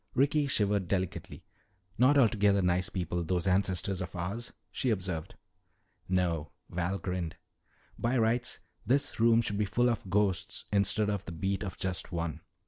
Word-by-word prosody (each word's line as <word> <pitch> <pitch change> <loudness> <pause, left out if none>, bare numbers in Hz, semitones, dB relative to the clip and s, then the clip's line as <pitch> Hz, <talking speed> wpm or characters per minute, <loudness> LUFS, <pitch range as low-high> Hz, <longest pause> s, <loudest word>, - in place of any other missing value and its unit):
Ricky 145 +2 +3
shivered 100 -6 +1
delicately. 95 -1 -3 0.5
"Not 130 +6 +5
altogether 105 -6 +4
nice 90 +2 +1
people, 90 -3 -2
those 90 +2 -1
ancestors 95 0 +1
of 90 +1 -6
ours," 100 +7 -3 0.2
she 130 - -1
observed. 90 -7 -2 0.7
"No," 85 -5 0 0.2
Val 90 +3 -1
grinned. 90 -3 -3 0.6
"By 120 +3 +1
rights 120 +2 +1 0.2
this 140 +3 +1
room 115 0 +5
should 105 -2 -1
be 105 - +2
full 120 +4 +2
of 105 -4 -4
ghosts 95 -1 +1
instead 105 +1 +2
of 100 -2 -3
the - - -6
beat 95 +4 -2
of 100 -4 -5
just 90 -1 -2
one. 85 -2 -3
100 Hz, 150 wpm, -30 LUFS, 90-110 Hz, 0.7 s, Not